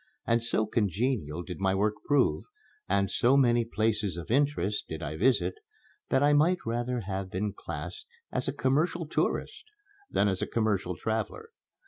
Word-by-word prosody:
And 115 0 +2
so 115 -1 +1
congenial 105 - -1
did 90 -1 -7
my 95 0 +2
work 105 +2 +2
prove, 145 -3 +2 0.4
and 100 -1 +2
so 125 +7 +4
many 120 -3 +4
places 110 -5 0
of 85 +4 -6
interest 135 -7 +1
did 80 -1 -6
I 75 - -4
visit, 120 +10 +2 0.6
that 135 - +3
I 145 0 +5
might 165 +5 +3
rather 120 +1 -1
have 95 -1 -4
been 100 +2 -2
classed 80 +5 -7 0.2
as 125 - -1
a - - +1
"commercial 155 +5 +1
tourist" - - -1 0.5
than 100 - +2
as 95 -2 0
a - - -1
commercial 100 -6 0
traveler. 110 +2 -3
110 Hz, 160 wpm, -29 LUFS, 95-130 Hz, 0.6 s, I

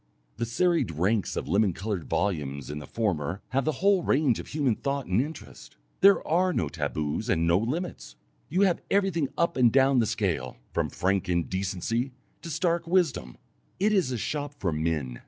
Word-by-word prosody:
The 115 0 -2
serried 170 - +1
ranks 95 +7 0
of - - -3
lemon 100 +3 +2
coloured 95 -2 -4
volumes 70 -8 -2
in 75 - -5
the 75 - -9
former 90 -4 -2
have 135 0 0
the 155 - +2
whole 200 -2 +5
range 135 -6 +2
of - - -7
human 140 -5 +1
thought 140 +1 -2
and 95 +6 +2
interest; 155 +4 -9 0.2
there 200 0 +5
are 180 +3 +2
no 80 - -1
taboos 75 -1 -3
and 80 - +2
no 85 +2 +4
limits, 155 - -4 0.3
you 180 +5 +1
have 190 -4 +3
everything 190 -8 +1
up 170 - +1
and 120 -3 +5
down 135 0 +4
the 115 - +2
scale, 90 - -2 0.2
from - - 0
frank 95 0 0
indecency 95 - -1 0.3
to 170 - -7
stark 170 +1 0
wisdom. 165 - 0 0.4
It 210 +3 +3
is 185 -10 +2
a 125 - -1
shop 145 +5 -3
for 90 - 0
men. 75 -6 -2
115 Hz, 180 wpm, -27 LUFS, -, 0.4 s, whole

